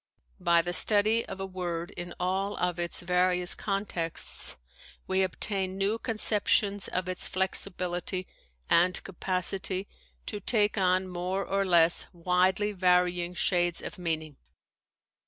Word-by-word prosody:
By 170 Hz, -1 st, +3 dB
the 175 Hz, +1 st, -3 dB
study 215 Hz, +4 st, +4 dB
of 195 Hz, -, -7 dB
a 195 Hz, -, -3 dB
word 175 Hz, -3 st, -5 dB
in 175 Hz, 0 st, -7 dB
all 190 Hz, +3 st, -1 dB
of 180 Hz, -1 st, -1 dB
its 170 Hz, 0 st, -1 dB
various 180 Hz, 0 st, +2 dB
contexts 195 Hz, -, -2 dB, 0.5 s
we 190 Hz, 0 st, +1 dB
obtain 190 Hz, 0 st, 0 dB
new 200 Hz, +3 st, 0 dB
conceptions 210 Hz, -3 st, +2 dB
of 185 Hz, 0 st, -3 dB
its 185 Hz, -1 st, -2 dB
flexibility 185 Hz, -1 st, -1 dB, 0.4 s
and 180 Hz, +2 st, +3 dB
capacity 185 Hz, +1 st, -2 dB, 0.4 s
to 210 Hz, -, -5 dB
take 210 Hz, 0 st, +2 dB
on 185 Hz, -1 st, +1 dB
more 185 Hz, +2 st, -3 dB
or 195 Hz, 0 st, 0 dB
less 170 Hz, -2 st, +3 dB
widely 180 Hz, +4 st, +1 dB
varying 180 Hz, -2 st, +1 dB
shades 175 Hz, -2 st, +1 dB
of 205 Hz, -, -7 dB
meaning. 160 Hz, -4 st, -3 dB
185 Hz, 125 wpm, -28 LUFS, 175-195 Hz, 0.5 s, study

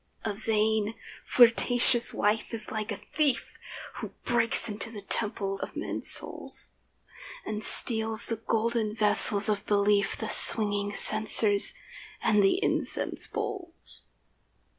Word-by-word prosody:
A 215 Hz, -, -3 dB
vain, 220 Hz, 0 st, -2 dB, 0.3 s
flirtatious 240 Hz, 0 st, +3 dB
wife 215 Hz, +2 st, -3 dB
is 215 Hz, -, -4 dB
like 215 Hz, 0 st, -6 dB
a -, -, -4 dB
thief 280 Hz, +4 st, -4 dB, 0.4 s
Who -, -, -7 dB, 0.2 s
breaks 230 Hz, -1 st, +1 dB
into 215 Hz, +1 st, -6 dB
the 210 Hz, -3 st, -11 dB
temple 195 Hz, -2 st, -4 dB
of -, -, -9 dB
men's -, -, 0 dB
souls, -, -, +2 dB, 0.7 s
And 215 Hz, 0 st, -6 dB
steals 220 Hz, -1 st, +2 dB
the 230 Hz, -, -6 dB
golden 225 Hz, -1 st, -3 dB
vessels 210 Hz, -1 st, +4 dB
of 210 Hz, -2 st, -2 dB
belief, 200 Hz, -1 st, -1 dB
The 220 Hz, -, -7 dB
swinging 205 Hz, -1 st, +3 dB
censers, 215 Hz, -1 st, +3 dB, 0.4 s
and 210 Hz, -2 st, 0 dB
the 195 Hz, -, +1 dB
incense -, -, +2 dB
bowls. 355 Hz, -4 st, -4 dB
215 Hz, 120 wpm, -25 LUFS, 205-230 Hz, 0.7 s, vessels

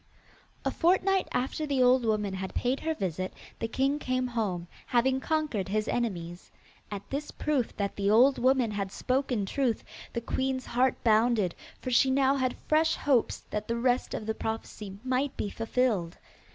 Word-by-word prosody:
A -, -, +2 dB
fortnight 375 Hz, +2 st, +2 dB
after 270 Hz, +4 st, -1 dB
the 270 Hz, -3 st, +2 dB
old 250 Hz, 0 st, +4 dB
woman 210 Hz, -3 st, 0 dB
had 190 Hz, 0 st, -5 dB
paid 250 Hz, +2 st, 0 dB
her 320 Hz, 0 st, -1 dB
visit, 185 Hz, -, -2 dB, 0.3 s
the 225 Hz, -, -1 dB
king 270 Hz, +5 st, 0 dB
came 255 Hz, -2 st, 0 dB
home, 210 Hz, -8 st, -2 dB, 0.2 s
having 260 Hz, +2 st, +2 dB
conquered 300 Hz, -10 st, -1 dB
his 215 Hz, +2 st, -1 dB
enemies. 175 Hz, -7 st, -3 dB, 0.4 s
At 205 Hz, -1 st, -6 dB
this 285 Hz, +2 st, -3 dB
proof 285 Hz, -6 st, -1 dB
that 200 Hz, -1 st, -2 dB
the 200 Hz, 0 st, 0 dB
old 255 Hz, +6 st, +5 dB
woman 255 Hz, -2 st, +3 dB
had 200 Hz, -2 st, -3 dB
spoken 255 Hz, -4 st, 0 dB
truth, 245 Hz, +2 st, 0 dB, 0.3 s
the 235 Hz, -, -1 dB
queen's 260 Hz, +2 st, -1 dB
heart 250 Hz, +1 st, +1 dB
bounded, 220 Hz, -4 st, +3 dB, 0.3 s
for 255 Hz, -, -2 dB
she 265 Hz, +2 st, +5 dB
now 270 Hz, +1 st, +3 dB
had 255 Hz, -2 st, 0 dB
fresh 315 Hz, +1 st, +3 dB
hopes 265 Hz, -6 st, +1 dB
that 210 Hz, 0 st, -3 dB
the 230 Hz, -, -1 dB
rest 245 Hz, +1 st, +1 dB
of 215 Hz, -, -5 dB
the 220 Hz, -, -1 dB
prophecy 220 Hz, -3 st, -5 dB
might 260 Hz, +2 st, 0 dB
be 205 Hz, -, -2 dB
fulfilled. 225 Hz, -7 st, 0 dB
245 Hz, 170 wpm, -29 LUFS, 210-265 Hz, 0.4 s, old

